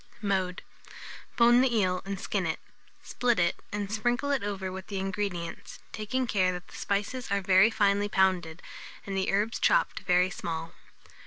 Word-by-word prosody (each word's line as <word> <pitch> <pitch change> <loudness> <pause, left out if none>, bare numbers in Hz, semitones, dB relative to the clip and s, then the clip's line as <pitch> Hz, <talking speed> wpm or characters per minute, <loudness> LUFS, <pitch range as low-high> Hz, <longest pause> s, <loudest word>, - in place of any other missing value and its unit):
Mode. 190 -3 -1 0.7
Bone 240 +1 +6
the 250 -3 +2
eel 185 -3 +1
and 195 0 -4
skin 195 -4 -1
it; 160 - -2 0.4
split 245 -2 0
it, 170 -1 +2
and 205 -1 -3
sprinkle 240 +6 0
it 275 - +1
over 195 -2 -3
with 190 0 -7
the 200 - -4
ingredients, 190 -3 -4
taking 255 +5 -2
care 190 -5 +2
that 180 0 -8
the - - -13
spices 210 +5 -2
are 200 0 +1
very 190 +2 +5
finely 205 -2 +2
pounded, 180 -4 +1 0.4
and 195 - -4
the 190 0 0
herbs 210 +4 0
chopped - - +2
very 180 +1 +2
small. 165 -1 -5
200 Hz, 165 wpm, -28 LUFS, 185-220 Hz, 0.7 s, Bone